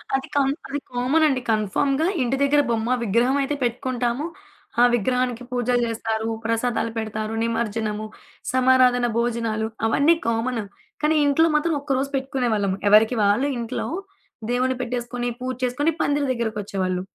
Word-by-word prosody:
అది 270 - -2
కమ్ 275 -1 +3 0.2
అది 285 +1 -3
కామనండి. 265 +2 +2
కన్ఫర్మ్‌గా 270 - +1 0.2
ఇంటి 250 +1 +1
దగ్గర 290 +1 +4
బొమ్మ 225 0 -1
విగ్రహం 235 +5 +2
అయితే 275 +2 -1
పెట్టుకుంటాము. 245 +2 -1 0.6
ఆ - - +7
విగ్రహానికి 250 +1 -1
పూజలు 245 0 +1
జేస్తారు, 225 0 -2 0.2
ప్రసాదాలు 230 0 0
పెడతారు, 215 0 -3
నిమజ్జనము, 220 -2 -2 0.5
సమారాధన 255 -1 +4
భోజనాలు 230 -2 -1 0.2
అవన్నీ 285 +9 +4
కామను. 230 0 0 0.4
కానీ 310 +1 +2
ఇంట్లో 285 +3 +4
మాత్రం 320 +2 +2
ఒక్కరోజు 275 -1 -1
పెట్టుకునేవాళ్ళం. 245 -7 0
ఎవరికి 215 +4 +5
వాళ్ళు 205 +7 +3
ఇంట్లో 235 +1 -3 0.6
దేవుడిని 255 +1 +1
పెట్టేసుకొని, 245 0 -3
పూజ 255 0 -3
చేసుకొని 255 +6 +1
పందిరి 285 0 +1
దగ్గరికొచ్చేవాళ్ళు. 200 -6 -2
245 Hz, 125 wpm, -23 LUFS, 225-265 Hz, 0.6 s, ఆ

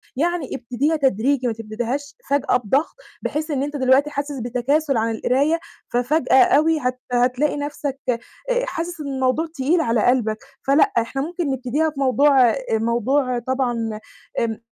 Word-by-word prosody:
يعني 330 0 -1
ابتديها 255 +6 -1
تدريجي 265 -1 +1
ما 235 - 0
تبتديهاش 235 +6 -4
فجأة 280 -3 +2
بضغط، 265 +6 0 0.3
بحيث 310 +1 -3
إن 275 -2 0
أنت 290 +1 -4
دلوقتي 265 +2 +3
حاسس 285 -1 -4
بتكاسُل 260 +4 0
عن 225 +1 +1
القراية، 285 +8 +1 0.3
ففجأة 260 +2 +4
أوي 315 +2 +3
هت 255 -2 -2
هتلاقي 250 +4 +1
نَفْسك 285 -1 -4
آآ، 235 -2 +1 0.5
حاسس 340 -7 -4
إن 290 - -5
الموضوع 265 +3 0
تقيل 310 +4 +1
على 230 -7 +1
قلبك 230 -4 +2 0.3
فلأ، 310 +10 +4
إحنا 230 +4 0
ممكن 330 -1 -2
نبتديها 265 +5 0
في 295 -2 -9
موضوع 275 +1 +4
آآ، - - 0 0.2
موضوع 240 +3 +1
طبعًا 240 -3 -2 0.4
آمم، 225 -1 -2
265 Hz, 150 wpm, -21 LUFS, 245-295 Hz, 0.5 s, ففجأة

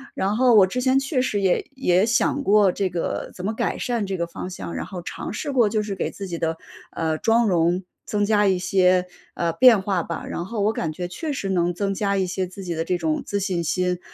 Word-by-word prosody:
然 195 +2 0
后 245 0 +4
我 200 -3 +8
之 250 +7 -3
前 260 +1 +3
确 270 -1 0
实 210 -5 0
也 190 -2 +2
也 185 -8 +2
想 235 +5 +1
过 205 -3 +4
这 190 +1 -1
个 170 -1 -3
怎 180 - -6
么 215 - -1
改 - - -1
善 235 -4 -1
这 190 -1 -2
个 170 - -1
方 170 +2 -7
向， 95 - -7
然 85 - -3
后 180 - -7
尝 - - -6
试 285 +6 -3
过 240 -6 +3
就 215 0 0
是 205 -1 -4
给 - - -2
自 200 - -7
己 170 -2 -5
的， 165 0 -1 0.4
呃， 160 -1 0
妆 230 +1 +3
容 175 0 +2 0.2
增 205 -1 0
加 210 -1 +3
一 190 -1 +3
些， 185 0 +3 0.3
呃， 170 -1 -1
变 235 -4 +6
化 190 -3 0
吧。 165 0 -5
然 170 - -4
后 220 0 -3
我 210 +2 +2
感 165 - -2
觉 175 +3 -5
确 300 - -5
实 230 -8 -3
能 175 -2 +1
增 195 +1 -1
加 200 0 0
一 190 - +1
些 185 +1 -2
自 190 +2 -10
己 175 -2 -3
的 165 0 -2
这 180 +2 -1
种 160 -2 -1
自 200 - -2
信 185 -3 -1
心， 180 +2 0
190 Hz, 270 characters per minute, -23 LUFS, 175-215 Hz, 0.4 s, 我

